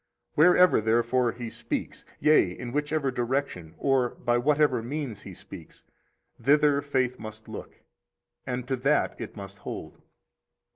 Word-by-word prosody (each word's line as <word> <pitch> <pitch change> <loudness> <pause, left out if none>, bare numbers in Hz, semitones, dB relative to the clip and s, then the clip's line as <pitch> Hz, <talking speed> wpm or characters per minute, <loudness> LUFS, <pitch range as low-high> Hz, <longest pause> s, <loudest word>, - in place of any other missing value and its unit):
Wherever, 180 -1 +5
therefore, 120 +2 +2
He 120 -1 -7
speaks, - - -5
yea, 150 -11 +5
in 120 -1 -6
whichever 145 0 0
direction 120 - -2
or 135 -3 +2
by 120 -1 0
whatever 145 -2 +2
means 125 -3 -5
He 95 - -10
speaks, 85 -3 -12 0.6
thither 145 +2 +4
faith 130 -3 -1
must 110 0 -9
look, - - -8 0.7
and 125 -1 -4
to 130 - 0
that 140 0 +1
it 115 - -7
must 100 -1 -9
hold. - - -8
125 Hz, 135 wpm, -27 LUFS, 115-145 Hz, 0.7 s, Wherever